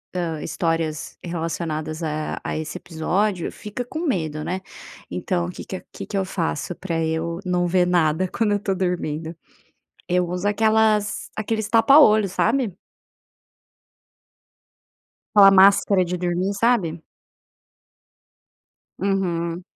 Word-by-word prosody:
hã, 165 -4 -2
histórias 165 -2 -2
relacionadas 165 -2 -3
a 155 -1 -3
a - - -3
esse 155 +3 -5
episódio, 180 +3 -1
fica 210 +4 -6
com 310 +6 -6
medo, 155 - -1
né. 185 +3 -3 0.5
Então 180 -1 -1
o - - -5
que - - -9
que - - -6
a - - -13
que - - -7
que 200 - -4
eu 190 - 0
faço 175 -2 -3
para 165 -3 -2
eu 160 +1 -2
não 180 -1 +1
ver 180 0 +3
nada 175 0 +2
quando 215 +3 0
eu 205 - +3
estou 195 -1 -2
dormindo, 170 -3 -2 0.7
eu 180 -1 +1
uso 180 +2 -3
aquelas 215 0 +2
aqueles 220 0 -2
tapa 235 +6 +6
olho, 215 -8 +6
sabe. 225 +1 0 2.6
Aquela 200 -1 +9
máscara 195 0 +5
de 180 +1 -3
dormir, 180 +2 -1
sabe? 200 -7 +1 2.0
Uhum. 175 -3 -1
180 Hz, 125 wpm, -22 LUFS, 165-205 Hz, 2.6 s, Aquela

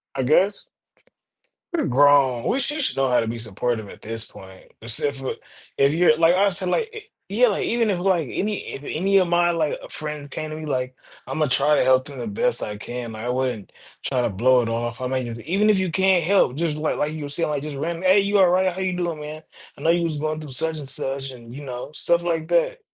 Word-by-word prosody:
I 135 - 0
guess. 190 +9 +2 1.0
We're 340 - 0
grown. 135 -2 +4
We 270 - +1
sh 295 +2 -2
should 255 - -1
know 135 -1 +2
how 125 - +4
to 115 - -1
be 115 +1 -3
supportive 110 0 -3
at - - -13
this 115 0 -6
point, 95 -1 -14
except 130 +5 -3
for, 135 -1 -4 0.4
if 140 +1 +4
you're 160 -2 +4
like 165 +1 +5
I 200 +1 +4
said, 180 0 -4
like, 455 - 0
i 435 - -6 0.3
yeah, 240 +3 +4
like 200 - -1
even 230 -3 +1
if 180 - -1
like 175 -6 +1
any 210 +1 -3
if 135 - -7
any 195 +7 +1
of 185 - +2
my 175 0 +3
like, 160 -3 0
uh, - - -8
friends 150 -2 -6
came 155 +2 -5
to 155 - -5
me 155 0 -6
like, 130 -2 -2 0.4
"Imma 155 -1 +1
try 140 +3 +3
to - - +4
help 130 0 +4
them 140 -2 -10
the - - -4
best 230 +3 -1
I 105 -1 -5
can." 120 0 -6
I 115 +3 -4
wouldn't 125 -5 -2 0.3
try 125 -2 0
to - - +1
blow 125 +5 +3
it 115 - -3
off. 115 +1 -3
I 130 - -3
mean 130 -2 -2
it's, 115 0 -6
even 200 +6 +2
if 210 - +5
you 185 -3 0
can't 190 -1 +3
help, 185 -8 +3
just 160 0 -1
like 155 0 -1
like 150 +1 -1
you 155 - -6
were 145 - -6
saying, 150 +2 -1
like 145 -2 -1
just 145 -1 -6
random, 165 +4 -3
"Hey, 190 +2 +5
you 200 +1 +2
all 190 - +7
right, 185 0 +2
how 190 - -7
are - - -1
you 185 -1 -1
doing, 170 -3 -2
man? 155 +1 -7 0.3
I - - -13
know 165 - +4
you 170 0 +2
was 160 -2 -2
going 155 +1 -2
through 145 -4 -9
such 160 +4 -2
and 140 - -8
such," 135 0 -4
and 120 -2 -11
you 145 +2 -8
know, 125 +2 -6
stuff 170 +2 0
like 165 -2 -1
that. - - +1
150 Hz, 255 wpm, -23 LUFS, 130-180 Hz, 1.0 s, all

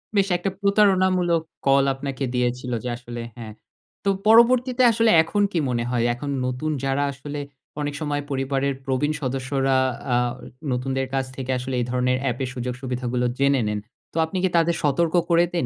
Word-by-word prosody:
বেশ 200 -1 +3
একটা 185 +3 -2
প্রতারণামূলক 185 -4 +3 0.3
কল 135 0 +5
আপনাকে 135 0 -5
দিয়েছিল 125 +1 -1
যে 125 - -3
আসলে 120 -1 -7 0.2
হ্যাঁ। 110 -2 -8 0.5
তো 200 - +1 0.2
পরবর্তীতে 245 +3 +5
আসলে 230 0 +3
এখন 205 +5 -1
কি 170 - 0
মনে 120 -1 0
হয়? 120 -2 +1
এখন 140 +4 -6 0.2
নতুন 130 +5 -2
যারা 135 +1 +1
আসলে 145 +2 -7 0.4
অনেক 145 0 -2
সময় 145 -1 -1
পরিবারের 135 +1 0
প্রবীণ 135 +2 0
সদস্যরা 135 0 0 0.4
আ - - +4 0.6
নতুনদের 130 +1 -1
কাছ 135 -1 0
থেকে 130 -1 -4
আসলে 125 +1 -4
এই 120 - 0
ধরনের 125 0 +1
অ্যাপের 130 0 -1
সুযোগ 125 -1 -3
সুবিধাগুলো 125 -1 -2
জেনে 140 -1 +3
নেন। 105 0 -1 0.3
তো - - -6
আপনি 175 +4 -5
কি 190 - +3
তাদের 170 0 +3
সতর্ক 160 +4 +1
করে 170 0 +5
দেন 170 - 0
135 Hz, 170 wpm, -23 LUFS, 125-170 Hz, 0.6 s, কল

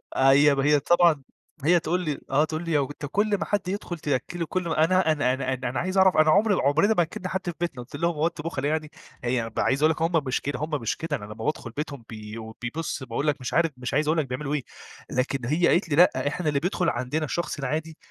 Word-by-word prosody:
أي 135 +2 +6
هي 150 +1 +4
طبعًا 170 -1 +3 0.4
هي 170 +4 +5
تقول 175 +3 -1
لي 150 -5 -3
آه، 145 +3 +3
تقول 155 +1 -4
لي: 165 - -2
"لو 145 - +3
أنت 145 - -7
كل 205 0 +2
ما - - -3
حد 205 -3 -1
يدخل 185 -2 -4
تأكله 150 +4 -2
كل 180 +1 -2
م - - -2
أنا 165 +2 +3
أنا 145 -5 +1
أنا 130 0 -2
أنا 125 -1 -3
أنا 120 0 -2
عايز 185 +2 -2
أعرف، 190 -1 +5
أنا 155 0 +5
عمري 205 +4 +4
عمرنا 165 +6 +3
ما 175 - +3
أكلنا 180 +3 -6
حد 190 - -1
في 175 - -2
بيتنا." 170 -8 -3
قلت 120 - -11
لهم: 170 +4 0
"هو 155 +2 +2
أنتم 170 -3 -6
بُخلا 145 -4 -2
يعني؟" 155 0 -2 0.3
هي 120 -2 -1
عايز 135 +2 +1
أقول 155 - +6
لك 160 - -5
هُم 165 +1 +2
مش 130 - -1
كده 140 -2 -3
هُم 155 - -3
مش 115 - -1
كده، 160 -2 -2
أنا 105 - -9
لمّا 105 - -8
بادخل 140 -6 -2
بيتهم 140 -1 -5
بي 110 -1 -8 0.2
بيبُص 140 +3 -4
باقول 130 +4 -3
لك 145 -2 0
مش 125 - -4
عارف 165 -1 +3
مش 125 +1 -5
عايز 150 +2 +1
أقول 155 +2 +2
لك 155 - +1
بيعملوا 135 +3 -3
إيه، 145 -3 -1 0.5
لكن 130 0 -1
هي 160 +7 +2
قالت 175 0 +2
لي: 145 - +1
لأ، 170 -3 +4
إحنا 155 +2 -2
اللي 145 -1 +1
بيدخل 180 +2 0
عندنا 130 +5 -2
الشخص 170 0 -3
العادي، 155 +4 -3
150 Hz, 250 wpm, -25 LUFS, 135-170 Hz, 0.5 s, أي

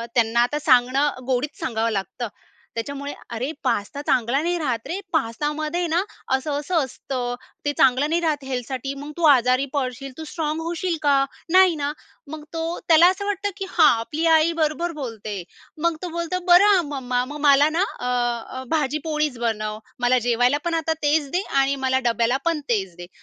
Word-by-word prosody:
त्यांना 235 0 +3
आता 295 +5 +1
सांगणं 265 +1 +3 0.2
गोडीत 270 +3 -1
सांगावं 230 -2 -1
लागतं. 215 +4 -3 0.5
त्याच्यामुळे, 280 +4 -4 0.2
"अरे 255 +6 -2
पास्ता 245 +2 -1
चांगला 250 +3 +2
नाही 345 +2 0
राहत 245 -7 -2
रे. 370 +4 -3
पास्ता 295 0 0
मध्ये 310 +3 -2
आहे 350 - 0
ना 340 +3 +2 0.3
असं-असं 295 +4 -1
असतं 245 -1 -4 0.3
ते 290 - +2
चांगलं 270 +3 +4
नाही 340 +1 +1
राहत 300 -4 0
हेल्थ 250 -3 -3
साठी. 270 +1 -4
मग 290 +2 -7
तू 340 - -4
आजारी 255 -1 +4
पडशील. 270 0 -3
तू 320 - -6
स्ट्राँग 310 0 -3
होशील 340 +1 -2
का? 280 -1 +4 0.3
नाही 370 -2 +6
ना." 290 -1 -2 0.4
मग 310 -1 -7
तो 325 - -2 0.3
त्याला 335 +1 +7
असं 390 +2 -3
वाटतं, 405 0 -1
की 390 - -4
हा 345 - +3 0.2
आपली 300 +8 -3
आई 320 0 +5
बरोबर 330 +1 0
बोलते. 225 -5 -5 0.5
मग 335 -1 +2
तो 360 - -4
बोलतो, 340 +2 -2
"बरं 355 +3 +7
आ 360 - +3
मम्मा, 255 -4 -2
मग 290 +3 -7
मला 285 0 +5
ना 335 +4 +1 0.2
अ, 245 0 -2
भाजीपोळीच 300 -2 0
बनव 215 -2 -2 0.2
मला 245 +1 +3
जेवायला. 245 +4 +3
पण 340 - 0
आता 320 0 0
तेच 290 -1 +2
दे 360 - +1 0.2
आणि 275 +1 +2
मला 260 0 +2
डब्याला 235 +2 +2
पण 335 -2 +1
तेच 190 -7 -1
दे." 175 0 -9
285 Hz, 180 wpm, -23 LUFS, 245-320 Hz, 0.5 s, त्याला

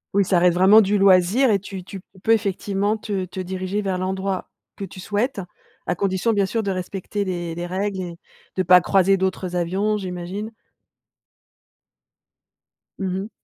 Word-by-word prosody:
Oui, 200 - +4
ça 180 -1 +3
reste 175 0 +4
vraiment 200 +4 +7
du 205 +1 +1
loisir 195 +6 +4
et 200 - +3
tu 195 -2 -8
tu 195 0 -9
tu 190 -1 -22
peux 225 - +2
effectivement 205 0 0
te 200 -3 -3
te 185 +1 -8
diriger 185 +2 -3
vers 185 -2 -1
l'endroit 190 0 -2 0.3
que 200 - -7
tu 190 0 -8
souhaites, 210 +4 -1 0.5
à - - 0
condition 190 +4 0
bien 200 -2 +2
sûr 225 +1 -1
de 195 - -1
respecter 190 +2 -3
les 175 -3 -3
les 175 +1 -4
règles 190 +1 -2
et 170 -2 -7 0.4
de 185 - +1
pas 180 0 +7
croiser 195 +2 +3
d'autres, 190 0 -1
heu, - - -3
avions, 195 +5 0
j'imagine? 185 +3 -5 2.5
Mmh 190 -2 -2
mh. 205 +3 -6
190 Hz, 175 wpm, -22 LUFS, 185-205 Hz, 2.5 s, vraiment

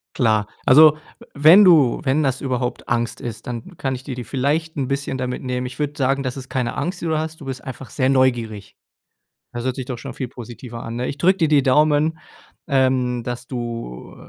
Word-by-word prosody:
Klar. 110 -7 +2 0.2
Also, 155 +3 +8 0.2
we - - -15
wenn 160 +8 +7
du 155 -9 +5
wenn 145 +3 +1
das 135 -2 0
überhaupt 125 -2 -3
Angst 120 +1 -1
ist, 120 -5 -7
dann 125 +9 -7
kann 135 -1 -2
ich 130 - -7
dir 135 - -5
die 125 -1 -6
vielleicht 150 +5 -1
'n 135 -2 -2
bisschen 135 -1 -2
damit 125 0 -3
nehmen. 125 -1 -2
Ich 125 0 -9
würde 145 -1 -1
sagen, 135 0 +1
dass 130 0 -4
es 135 -1 -8
keine 125 -3 -2
Angst, 180 +1 -3
die 170 - -4
du 160 -1 +1
hast. 160 0 -5
Du - - -9
bist 130 -1 -6
einfach 130 -1 -8
sehr 130 -2 0
neugierig. 120 -6 0 0.8
Das 120 0 -4
hört 130 -1 -1
sich 130 - -5
doch 125 -3 -5
schon - - -8
viel 130 - -4
positiver 120 0 -9
an, 115 +1 -5
ne? 125 - -2
Ich 140 - -5
drücke 185 +6 +3
dir 160 - +3
die 145 -3 +4
Daumen, 150 +3 +3 0.5
ähm, 130 -3 +1
dass 120 +1 -5
du 115 - -6
130 Hz, 220 wpm, -21 LUFS, 125-145 Hz, 0.8 s, Also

